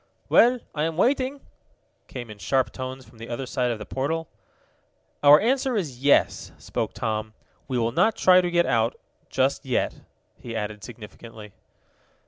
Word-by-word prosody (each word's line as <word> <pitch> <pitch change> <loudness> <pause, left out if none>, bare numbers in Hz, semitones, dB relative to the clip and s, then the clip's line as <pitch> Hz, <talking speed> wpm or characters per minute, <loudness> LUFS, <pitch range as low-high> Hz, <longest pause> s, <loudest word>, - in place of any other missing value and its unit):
"Well, 245 +2 +6 0.2
I 150 0 0
am 165 -1 -3
waiting!" 265 +5 +1 0.7
came 120 -4 -8
in 105 - -12
sharp 130 0 0
tones 130 0 -7
from 115 - -19
the 115 - -9
other 120 +3 -4
side 125 -1 -1
of 115 - -2
the 105 - -8
portal. 160 +7 -2 0.9
"Our 145 +1 +8
answer 260 +2 +1
is 150 - -3
yes," 145 - +3
spoke - - -4
Tom. 110 0 -3 0.3
"We 130 -3 -2
will 115 -1 +1
not 220 - +2
try 185 0 +6
to 175 - -1
get 175 0 +2
out 115 +1 0 0.3
just 135 +1 0
yet," 130 -3 -1 0.4
he 115 -1 -7
added 105 -1 -4
significantly. 110 -1 -11
130 Hz, 160 wpm, -25 LUFS, 115-165 Hz, 0.9 s, Our